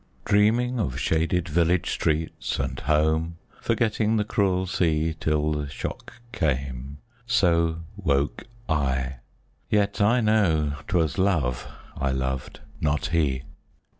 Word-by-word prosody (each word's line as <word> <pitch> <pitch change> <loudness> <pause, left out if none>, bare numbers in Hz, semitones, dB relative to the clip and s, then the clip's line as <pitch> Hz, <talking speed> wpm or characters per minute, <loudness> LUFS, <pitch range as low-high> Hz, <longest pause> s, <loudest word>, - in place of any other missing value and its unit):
Dreaming 115 +5 +3
of 65 - -1
shaded 80 +3 +1
village 85 +2 +2
streets, 80 +1 -1
and 65 -1 -3
home, 80 +3 +1 0.2
Forgetting 110 -1 +1
the 105 - +2
cruel 95 -3 +1
sea 80 -3 +1
Till 75 0 +1
the 75 -2 -2
shock - - -6 0.2
came 70 - -2 0.3
so 85 -7 +2
woke 70 0 0 0.2
I, 65 -4 0 0.5
yet 100 -1 +1
I 115 +5 +4
know 95 -10 +2
'Twas 80 -5 +1
Love, 75 -11 +1 0.3
I 70 - -1
loved, 65 0 -3 0.2
not 75 -1 +1
he. 70 -6 +1
80 Hz, 115 wpm, -25 LUFS, 70-100 Hz, 0.5 s, I